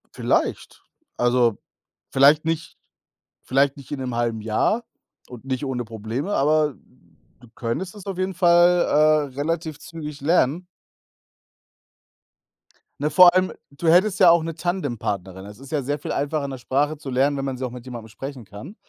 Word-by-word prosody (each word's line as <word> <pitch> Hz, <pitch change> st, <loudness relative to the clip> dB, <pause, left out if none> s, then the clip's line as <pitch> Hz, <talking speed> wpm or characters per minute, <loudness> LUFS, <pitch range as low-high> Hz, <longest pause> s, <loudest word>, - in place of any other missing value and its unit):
Vielleicht. -, -, -1 dB, 0.3 s
Also 120 Hz, -2 st, +2 dB, 0.5 s
vielleicht 145 Hz, +4 st, +5 dB
nicht 165 Hz, 0 st, -3 dB, 0.7 s
vielleicht 135 Hz, +1 st, +1 dB
nicht 140 Hz, -, -13 dB
in 145 Hz, -, -3 dB
'nem 125 Hz, -2 st, -4 dB
1/2 115 Hz, -2 st, -1 dB
Jahr 115 Hz, -, 0 dB, 0.5 s
und 125 Hz, +1 st, -11 dB
nicht 130 Hz, +1 st, -3 dB
ohne 125 Hz, -2 st, -3 dB
Probleme, 115 Hz, -, -4 dB
aber 150 Hz, -1 st, +2 dB, 0.7 s
du 120 Hz, -, -17 dB
könntest 125 Hz, +11 st, -4 dB
es 200 Hz, -, -11 dB
auf 195 Hz, -2 st, -4 dB
jeden 185 Hz, +1 st, -1 dB
Fall, 175 Hz, 0 st, +5 dB, 0.5 s
äh, 130 Hz, -, -19 dB
relativ 155 Hz, +1 st, -3 dB
zügig 150 Hz, -3 st, -8 dB
lernen. 165 Hz, +2 st, +2 dB, 2.3 s
Ne, 150 Hz, +2 st, 0 dB
vor 175 Hz, +3 st, +7 dB
allem 185 Hz, 0 st, +2 dB, 0.2 s
du 150 Hz, +4 st, -5 dB
hättest 185 Hz, +4 st, +4 dB
ja 185 Hz, -3 st, +8 dB
auch 170 Hz, -1 st, +5 dB
'ne 165 Hz, 0 st, -4 dB
Tandempartnerin. 105 Hz, -, -3 dB
Das 105 Hz, 0 st, -11 dB
ist 135 Hz, 0 st, -13 dB
ja 150 Hz, -3 st, 0 dB
sehr 145 Hz, +3 st, -2 dB
viel -, -, -5 dB
einfacher, 145 Hz, 0 st, -1 dB
'ne 135 Hz, -2 st, -7 dB
Sprache 145 Hz, +5 st, 0 dB
zu 145 Hz, -2 st, -8 dB
lernen, 135 Hz, +3 st, +1 dB
wenn 135 Hz, -, -3 dB
man 130 Hz, -1 st, -3 dB
sie 130 Hz, -, -3 dB
auch 125 Hz, -, -5 dB
mit 125 Hz, 0 st, -10 dB
jemandem 120 Hz, -3 st, -8 dB
sprechen 135 Hz, 0 st, -8 dB
kann, 105 Hz, -, -11 dB
140 Hz, 165 wpm, -23 LUFS, 125-165 Hz, 2.3 s, ja